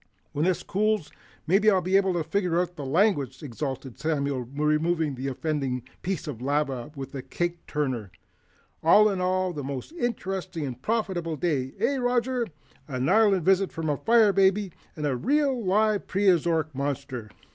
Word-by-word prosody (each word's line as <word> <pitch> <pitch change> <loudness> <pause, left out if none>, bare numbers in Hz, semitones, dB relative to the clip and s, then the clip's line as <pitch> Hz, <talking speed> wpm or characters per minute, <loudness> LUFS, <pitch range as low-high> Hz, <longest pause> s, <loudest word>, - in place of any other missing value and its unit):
"When 150 +3 0
this 185 -1 +1
cools, 210 -4 0 0.3
maybe 200 +6 +4
I'll 195 -3 +4
be 185 +2 0
able 195 -1 +4
to 170 -2 0
figure 180 -1 0
out 180 0 -2
the 145 -4 -6
language," 145 - +1
exulted 135 -1 -5
Samuel, 140 -4 -1
removing 155 +2 +1
the 130 +1 -4
offending 135 -2 -2 0.2
piece 185 -3 -3
of 130 -6 -6
lava 135 -2 -1
with 135 0 -7
a 135 - -4
cake 175 +4 -4
turner. 130 - -2 0.7
"All 210 +6 +6
in 190 -2 -2
all, 185 0 +1
a - - -4
most 135 - -5
interesting 190 - -3
and 125 -2 -6
profitable 190 - -1
day, 140 -5 -1
eh, 240 +7 +1
Roger? 245 -1 0 0.4
An 130 -2 -2
island, 205 +1 +5
a - - 0
visit 190 +2 +3
from 160 -2 -2
a 145 - -1
fire 225 -3 +4
baby, 195 0 +3 0.2
and 150 - -3
a 140 -3 +1
real 270 - +1
live 210 +2 +2
Preoztoric 170 -5 +2
monster." 135 -4 -4
170 Hz, 170 wpm, -26 LUFS, 140-195 Hz, 0.7 s, All